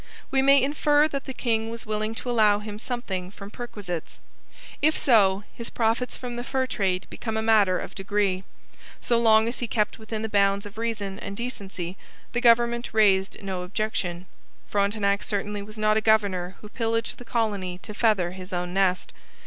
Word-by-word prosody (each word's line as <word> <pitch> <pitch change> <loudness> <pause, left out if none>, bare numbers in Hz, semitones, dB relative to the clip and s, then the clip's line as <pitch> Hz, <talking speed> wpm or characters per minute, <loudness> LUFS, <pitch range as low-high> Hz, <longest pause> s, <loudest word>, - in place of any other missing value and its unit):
We 270 - +3
may 275 +1 +6
infer 295 +1 +3
that 275 -2 -4
the 265 - -5
king 225 -3 0
was 230 0 -7
willing 215 +1 -2
to 245 - -5
allow 215 -3 +5
him 210 0 -7
something 200 -7 -4
from 200 +1 -10
perquisites. 200 -9 -6 0.6
If 310 +2 +3
so, 205 -7 +4
his 235 - -5
profits 230 +2 0
from 245 -2 -6
the 240 - -3
fur 260 +1 0
trade 190 -7 -1
become 220 -1 -4
a 220 - 0
matter 210 -5 +4
of - - -6
degree. 195 -1 0 0.6
So 235 -1 +2
long 220 -1 +5
as 235 - -3
he 240 - -2
kept 210 -1 0
within 220 0 -5
the - - -1
bounds 200 -1 +2
of 205 +2 -9
reason 210 -4 -3
and 200 0 -6
decency, 195 -7 -5 0.3
the 240 - -1
government 235 -1 +3
raised 195 -2 +3
no 190 -2 -3
objection. 180 -2 -2 0.5
Frontenac 200 0 +1
certainly 205 0 -2
was 215 +2 -10
not 215 0 +3
a - - +2
governor 200 -5 +2
who 210 - -10
pillaged 230 0 -2
the - - -8
colony 205 -6 -1
to 210 - -7
feather 205 -6 +2
his 185 +1 -9
own 180 0 -3
nest. 190 -1 +1
215 Hz, 180 wpm, -26 LUFS, 195-230 Hz, 0.6 s, may